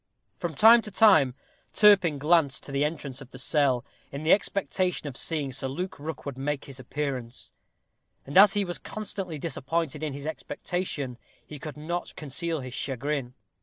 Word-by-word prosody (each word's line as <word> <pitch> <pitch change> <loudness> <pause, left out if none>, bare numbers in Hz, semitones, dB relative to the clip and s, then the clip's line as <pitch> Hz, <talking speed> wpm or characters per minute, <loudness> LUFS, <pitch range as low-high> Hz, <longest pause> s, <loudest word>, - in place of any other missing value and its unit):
From 170 -3 -3
time 230 +7 +8
to 215 - -7
time 170 - +5 0.4
Turpin 190 -8 +5
glanced 150 -1 +2
to - - -8
the 140 +1 +1
entrance 145 -3 -3
of 130 - -11
the 130 - -11
cell, 135 -2 +1 0.3
in 140 +2 -6
the 155 - +6
expectation 185 -4 0
of 135 - -6
seeing 145 -2 -2
Sir 135 - -3
Luke 180 +7 -5
Rookwood 145 -3 -6
make 145 +1 -2
his 135 -1 -10
appearance; 130 -2 -5 0.7
and, 140 - -8
as 195 +1 +8
he 205 -1 +1
was 175 -1 -5
constantly 195 -6 -5
disappointed 155 0 -2
in 155 -3 -3
his 140 +1 -7
expectation, 155 -5 -4 0.3
he 150 - -9
could 150 +1 -7
not 170 +4 -4
conceal 160 +2 -3
his 130 -1 -7
chagrin. 135 -1 -3
150 Hz, 165 wpm, -27 LUFS, 135-175 Hz, 0.7 s, time